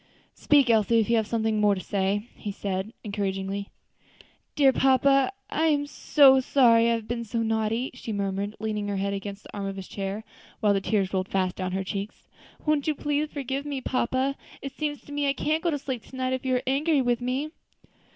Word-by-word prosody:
"Speak, 280 Hz, -5 st, +4 dB
Elsie, 225 Hz, +1 st, +3 dB
if 225 Hz, +1 st, +1 dB
you 235 Hz, -, +4 dB
have 220 Hz, -1 st, -1 dB
anything 220 Hz, -2 st, +1 dB
more 205 Hz, -1 st, +4 dB
to -, -, -5 dB
say," 200 Hz, +2 st, -1 dB
he 205 Hz, -, -5 dB
said 195 Hz, +1 st, -3 dB
encouragingly. 200 Hz, -1 st, -3 dB, 0.9 s
"Dear 275 Hz, -2 st, +5 dB
papa, 270 Hz, +3 st, +4 dB, 0.2 s
I 315 Hz, -, +1 dB
am 290 Hz, -2 st, +2 dB
so 280 Hz, -2 st, +5 dB
sorry 235 Hz, -3 st, +4 dB
I 235 Hz, -, +3 dB
have 225 Hz, -1 st, -6 dB
been 235 Hz, 0 st, -3 dB
so 230 Hz, +1 st, -2 dB
naughty," 225 Hz, +3 st, 0 dB
she 250 Hz, -2 st, -7 dB
murmured, 200 Hz, 0 st, -2 dB
leaning 210 Hz, -1 st, -2 dB
her 200 Hz, -1 st, -2 dB
head 200 Hz, +1 st, -1 dB
against 200 Hz, +1 st, -6 dB
the -, -, -12 dB
arm 200 Hz, -1 st, -3 dB
of 195 Hz, -, -4 dB
his 190 Hz, -1 st, -7 dB
chair, 200 Hz, +2 st, -4 dB, 0.4 s
while 210 Hz, -2 st, +3 dB
the 195 Hz, -, 0 dB
tears 195 Hz, -2 st, 0 dB
rolled 185 Hz, 0 st, -1 dB
fast 185 Hz, -2 st, 0 dB
down 185 Hz, -1 st, -3 dB
her 190 Hz, 0 st, -1 dB
cheeks; 200 Hz, +2 st, -6 dB, 0.4 s
"won't 300 Hz, -2 st, +1 dB
you 310 Hz, -, +1 dB
please 295 Hz, +1 st, -1 dB
forgive 275 Hz, -1 st, -3 dB
me, 285 Hz, -2 st, -3 dB
papa? 260 Hz, +1 st, 0 dB, 0.2 s
it 275 Hz, -, -6 dB
seems 295 Hz, -1 st, -3 dB
to -, -, -14 dB
me 290 Hz, -1 st, 0 dB
I -, -, +2 dB
can't 310 Hz, +3 st, 0 dB
go 345 Hz, -, +1 dB
to 300 Hz, -, 0 dB
sleep 260 Hz, -4 st, -4 dB
to -, -, -13 dB
night 260 Hz, 0 st, -1 dB
if 260 Hz, -, -3 dB
you 255 Hz, -, +2 dB
are 250 Hz, -, -1 dB
angry 285 Hz, +3 st, +2 dB
with 245 Hz, -1 st, +1 dB
me." 260 Hz, +5 st, -2 dB
230 Hz, 215 wpm, -26 LUFS, 200-275 Hz, 0.9 s, Dear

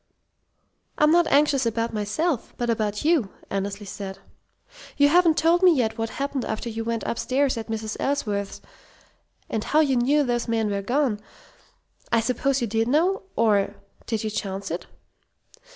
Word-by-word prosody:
"I'm 300 Hz, 0 st, +4 dB
not 345 Hz, 0 st, +4 dB
anxious 280 Hz, -3 st, +3 dB
about 230 Hz, 0 st, -1 dB
myself, 225 Hz, +7 st, -2 dB
but 240 Hz, -1 st, 0 dB
about 215 Hz, +1 st, -2 dB
you," 310 Hz, -, +3 dB, 0.2 s
Annesley 200 Hz, +1 st, -3 dB
said. 190 Hz, 0 st, -7 dB, 0.8 s
"You 285 Hz, 0 st, +5 dB
haven't 335 Hz, 0 st, +4 dB
told 335 Hz, +2 st, +3 dB
me 360 Hz, -3 st, +6 dB
yet 225 Hz, -3 st, 0 dB
what 225 Hz, 0 st, -1 dB
happened 275 Hz, -2 st, -2 dB
after 220 Hz, +2 st, -3 dB
you 225 Hz, 0 st, -4 dB
went 230 Hz, 0 st, -2 dB
upstairs 260 Hz, +3 st, 0 dB
at 225 Hz, -1 st, -5 dB
Mrs. 220 Hz, -1 st, -4 dB
Ellsworth's, 210 Hz, -8 st, -2 dB, 0.9 s
and 220 Hz, -, -2 dB
how 305 Hz, -, +2 dB
you 280 Hz, -4 st, +3 dB
knew 280 Hz, +5 st, +3 dB
those 240 Hz, -2 st, -1 dB
men 225 Hz, -2 st, 0 dB
were 200 Hz, 0 st, -1 dB
gone. 245 Hz, 0 st, 0 dB, 0.9 s
I 235 Hz, -, +4 dB
suppose 255 Hz, +3 st, 0 dB
you 235 Hz, -, 0 dB
did 225 Hz, +2 st, 0 dB
know? 335 Hz, +9 st, +2 dB
Or 205 Hz, -3 st, +2 dB, 0.3 s
did 225 Hz, -2 st, -2 dB
you 215 Hz, -, -2 dB
chance 195 Hz, -2 st, -4 dB
it?" 170 Hz, -, -4 dB
230 Hz, 160 wpm, -24 LUFS, 215-285 Hz, 0.9 s, me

